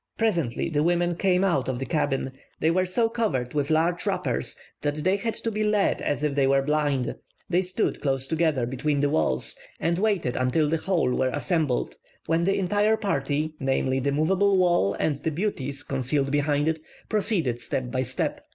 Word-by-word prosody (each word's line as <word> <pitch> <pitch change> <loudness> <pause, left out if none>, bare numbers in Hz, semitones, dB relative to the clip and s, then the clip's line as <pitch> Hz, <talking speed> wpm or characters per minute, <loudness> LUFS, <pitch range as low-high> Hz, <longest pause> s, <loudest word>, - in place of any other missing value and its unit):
Presently 170 - 0
the 150 -1 +1
women 175 +1 +1
came 185 +1 +2
out 155 -10 +1
of 130 - -1
the 135 - -3
cabin; 135 -4 -1 0.3
they 160 - +3
were 185 +2 +1
so 225 +6 +2
covered 210 - -1
with 145 -1 0
large 165 +3 +2
wrappers - - -1 0.3
that 145 0 -1
they 185 +6 +1
had 220 +3 -2
to 230 - -3
be 215 0 -1
led 210 -1 +2
as 145 0 -1
if 150 -2 +1
they 140 -1 +2
were 135 0 +3
blind. 145 -3 0 0.4
They 180 +1 +4
stood 185 0 -2
close 135 -2 0
together 155 -4 +1
between 140 +4 -1
the 145 0 +2
walls, 65 - +1 0.2
and 170 +1 0
waited 195 - +1
until 130 +5 +2
the 165 +2 +1
whole 165 -6 0
were 130 - +1
assembled, 145 0 -1 0.3
when 165 +1 +1
the 195 - +2
entire 205 +3 +2
party, 155 -5 -1
namely, 135 0 0
the 140 +2 0
moveable 190 +7 +2
wall 175 - +3
and 150 -3 0
the 160 - -2
beauties 145 -6 -3
concealed 135 +1 0
behind 145 0 +1
it, 160 0 0 0.3
proceeded 195 - 0
step 125 0 -3
by 130 0 0
step. 130 - -2
155 Hz, 190 wpm, -25 LUFS, 135-185 Hz, 0.4 s, They